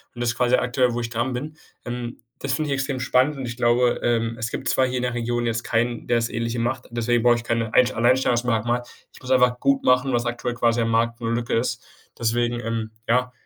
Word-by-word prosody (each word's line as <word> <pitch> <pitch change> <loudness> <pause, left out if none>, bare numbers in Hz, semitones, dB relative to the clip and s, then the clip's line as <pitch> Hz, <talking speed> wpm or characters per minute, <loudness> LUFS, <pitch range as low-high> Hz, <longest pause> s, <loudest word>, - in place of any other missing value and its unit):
und 120 - -7
das 120 -1 0
quasi 125 0 +3
aktuell, 125 0 +1
wo 120 - -2
ich 115 - -4
dran 120 +2 -2
bin, 150 +5 -5 0.3
ähm. 120 0 -5 0.2
Das 140 - -3
finde 155 +1 -1
ich - - +1
extrem 135 -1 -2
spannend 130 +3 +2
und 135 - -4
ich 115 -1 -5
glaube, 120 +1 +2
ähm, 115 -1 +1
es 115 0 -3
gibt - - -4
zwar 130 - +3
hier 130 0 -2
in 125 - -2
der 125 -1 -1
Region 120 0 -1
jetzt 115 0 -1
keinen, 120 0 -1
der 120 - +2
das 115 0 0
Ähnliche 115 +1 -2
macht. 125 +2 -2
Deswegen 120 0 +1
brauche 120 -1 +5
ich 120 0 -5
keine 115 -2 -1
einsch 125 0 +5
Alleinstellungsmerkmal. 120 -1 +1 0.3
Ich - - -16
muss 130 0 -6
einfach 125 -1 +4
gut 140 0 +2
machen, 125 +1 +3
was 120 -1 0
aktuell 120 0 -2
quasi 120 0 +1
am 115 - 0
Markt 115 +1 +1
'ne 115 - -2
Lücke 120 0 -2
ist. 125 +2 0 0.4
Deswegen, 120 +1 0
ähm, 115 -1 -3 0.2
ja, 125 +2 +2
120 Hz, 235 wpm, -23 LUFS, 115-125 Hz, 0.4 s, brauche